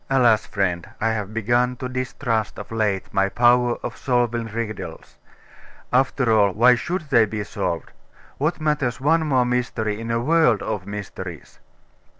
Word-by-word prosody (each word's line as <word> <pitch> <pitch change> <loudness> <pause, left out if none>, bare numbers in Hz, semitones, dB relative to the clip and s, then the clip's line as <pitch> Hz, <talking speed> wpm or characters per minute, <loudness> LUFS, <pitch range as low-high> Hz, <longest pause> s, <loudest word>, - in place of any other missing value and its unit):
'Alas, 120 -5 +3
friend! 90 -4 -1
I 115 - +1
have 105 -2 -3
begun 120 +3 +1
to 125 - -5
distrust, 125 -3 -2
of - - -9
late, 100 -3 -1
my 95 0 +2
power 120 +1 +3
of - - -4
solving 120 -2 0
riddles. 110 -1 -6 0.8
After 130 -1 +2
all, 100 -3 +4
why 120 +5 +6
should 170 +10 -2
they 115 -4 +6
be 105 0 -4
solved? 85 -5 -3 0.5
What 155 +5 0
matters 150 -5 0
one 160 +3 +2
more 130 -4 +3
mystery 120 -4 -1
in 115 - -5
a 115 0 +1
world 140 -4 +3
of 100 -3 -4
mysteries? 95 -4 -8
115 Hz, 150 wpm, -22 LUFS, 105-125 Hz, 0.8 s, why